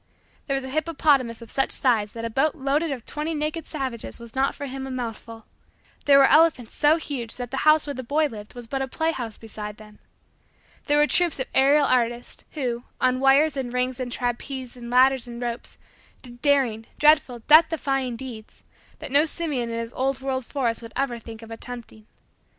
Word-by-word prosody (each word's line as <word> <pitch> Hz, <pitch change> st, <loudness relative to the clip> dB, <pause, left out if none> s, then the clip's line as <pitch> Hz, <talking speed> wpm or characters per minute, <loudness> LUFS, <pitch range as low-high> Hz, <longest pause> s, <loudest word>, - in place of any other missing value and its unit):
There 275 Hz, -, 0 dB
was 270 Hz, -, -2 dB
a 265 Hz, -, -6 dB
hippopotamus 285 Hz, -6 st, +1 dB
of 230 Hz, -, -11 dB
such 270 Hz, -, +1 dB
size 220 Hz, -5 st, +1 dB
that 230 Hz, 0 st, -5 dB
a -, -, -2 dB
boat 285 Hz, +7 st, +1 dB
load 280 Hz, +1 st, 0 dB
of 275 Hz, -8 st, -3 dB
twenty 310 Hz, +2 st, -3 dB
naked 305 Hz, +2 st, -3 dB
savages 260 Hz, -8 st, -5 dB
was 235 Hz, -1 st, -10 dB
not 270 Hz, +1 st, +1 dB
for 285 Hz, -, -6 dB
him 265 Hz, 0 st, -6 dB
a -, -, -6 dB
mouthful. 230 Hz, -2 st, -6 dB, 0.6 s
There 280 Hz, -1 st, +7 dB
were 275 Hz, -, +7 dB
elephants 305 Hz, -6 st, +4 dB
so 300 Hz, +1 st, +4 dB
huge 260 Hz, -8 st, -5 dB
that 245 Hz, -2 st, -6 dB
the 270 Hz, -, -3 dB
house 305 Hz, -1 st, +5 dB
where 285 Hz, -, -4 dB
the 260 Hz, -, -5 dB
boy 290 Hz, +5 st, +1 dB
lived 215 Hz, -5 st, -7 dB
was 245 Hz, -1 st, -6 dB
but 270 Hz, +3 st, -3 dB
a 265 Hz, -, -1 dB
play 320 Hz, +5 st, 0 dB
house 235 Hz, -8 st, -5 dB
beside 210 Hz, -1 st, -7 dB
them. 210 Hz, -1 st, -15 dB, 0.9 s
There 290 Hz, 0 st, +2 dB
were 295 Hz, -, +5 dB
troops 345 Hz, -1 st, +2 dB
of 260 Hz, -, -1 dB
aerial 285 Hz, +2 st, +5 dB
artists, 240 Hz, -1 st, 0 dB
who, 245 Hz, -5 st, -3 dB, 0.2 s
on 255 Hz, 0 st, +2 dB
wires 275 Hz, +3 st, +4 dB
and 260 Hz, -3 st, -3 dB
rings 250 Hz, +1 st, -1 dB
and 250 Hz, -1 st, -4 dB
trapeze 250 Hz, +1 st, -4 dB
and 240 Hz, -1 st, -9 dB
ladders 255 Hz, 0 st, +4 dB
and 235 Hz, 0 st, -8 dB
ropes, 240 Hz, -1 st, -5 dB, 0.5 s
did 240 Hz, -1 st, -11 dB
daring, 260 Hz, -7 st, +2 dB
dreadful, 295 Hz, -6 st, +3 dB
death 315 Hz, +2 st, +8 dB
defying, 270 Hz, -6 st, -1 dB
deeds, 230 Hz, -3 st, -10 dB, 0.3 s
that 300 Hz, -3 st, -8 dB
no 290 Hz, +3 st, +5 dB
simian 300 Hz, -8 st, -2 dB
in 230 Hz, -, -3 dB
his 230 Hz, 0 st, -4 dB
old 265 Hz, 0 st, -1 dB
world 265 Hz, -2 st, -3 dB
forest 245 Hz, -5 st, -1 dB
would 230 Hz, -1 st, -10 dB
ever 265 Hz, -3 st, -1 dB
think 225 Hz, 0 st, -10 dB
of 225 Hz, -, -12 dB
attempting. 225 Hz, -2 st, -9 dB
260 Hz, 200 wpm, -24 LUFS, 235-285 Hz, 0.9 s, death